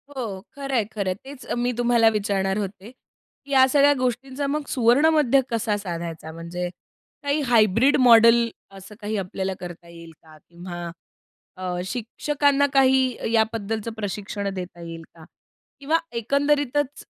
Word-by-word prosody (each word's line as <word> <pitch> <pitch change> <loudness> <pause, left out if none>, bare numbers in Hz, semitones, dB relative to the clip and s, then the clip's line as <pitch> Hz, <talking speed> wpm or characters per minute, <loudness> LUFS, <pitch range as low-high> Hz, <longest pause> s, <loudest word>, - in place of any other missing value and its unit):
हो, 215 -7 -4
खरंय, 275 -4 -1
खरंय. 200 -3 -3
तेच 265 +6 -12
अ, - - -3
मी 245 +1 0
तुम्हाला 235 -2 +4
विचारणार 200 -2 -1
होते. 200 +2 -5 0.6
या 265 -2 +5
सगळ्या 285 +1 +5
गोष्टींचा 260 +3 -2
मग 295 +1 -2
सुवर्णमध्य 275 +2 +4
कसा 225 -2 0
साधायचा? 170 -4 -6
म्हणजे 170 +2 -5 0.5
काही 285 +1 0
हायब्रिड 235 +4 +4
मॉडेल 230 -1 +6 0.3
असं 200 +2 -12
काही 210 0 -3
आपल्याला 190 0 -3
करता 175 -1 -9
येईल 170 -1 -12
का? 155 -1 -16
किंवा 175 0 -7 0.7
अ, 180 -1 -3
शिक्षकांना 285 +5 0
काही 260 -3 +2
याबद्दलचं 225 0 -1
प्रशिक्षण 205 -1 -4
देता 180 -2 -7
येईल 165 -1 -8
का? 160 -1 -14 0.6
किंवा 310 +4 +2 0.2
एकंदरीतच 285 +3 0
225 Hz, 130 wpm, -23 LUFS, 190-265 Hz, 0.7 s, मॉडेल